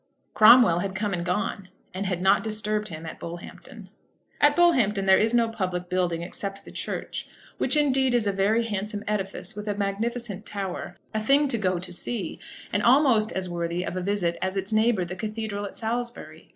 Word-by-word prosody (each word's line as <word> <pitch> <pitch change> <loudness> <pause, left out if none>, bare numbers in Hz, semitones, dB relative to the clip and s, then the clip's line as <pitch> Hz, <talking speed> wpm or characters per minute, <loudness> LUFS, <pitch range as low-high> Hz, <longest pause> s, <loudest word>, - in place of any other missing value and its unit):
Cromwell 215 -5 +7
had 190 +1 -3
come 205 0 -1
and 175 -1 -2
gone, 185 +1 -2 0.2
and 190 +2 -3
had 180 -1 -2
not 190 +1 +4
disturbed 215 -1 -1
him 160 -2 -8
at 160 - -8
Bullhampton. 170 +1 -9 0.5
At 290 0 +5
Bullhampton 240 - +3
there 190 0 +6
is 225 +2 +2
no 235 -1 +4
public 185 -5 -3
building, 175 -2 0
except 195 +2 -6
the - - -11
church, - - -4 0.3
which - - +3
indeed 265 -3 +3
is 235 -3 +2
a 200 - +2
very 200 +4 +2
handsome 205 -1 -3
edifice 195 -3 -2
with 210 0 -7
a 205 - -1
magnificent 210 +1 -3
tower, 195 -4 -5 0.2
a 215 - -1
thing 280 +6 +3
to 235 - +1
go 185 -3 +1
to 180 +1 -5
see, 185 0 -4 0.3
and 205 - +2
almost 240 -3 +4
as 190 -1 -2
worthy 170 0 -2
of 185 - -4
a 185 - -2
visit 180 -3 -1
as 190 +1 -1
its 195 +3 -2
neighbour 215 -4 +2
the 175 +2 -6
cathedral 215 +1 -4
at 200 - -8
Salisbury. 235 +1 -5
205 Hz, 190 wpm, -26 LUFS, 185-225 Hz, 0.5 s, Cromwell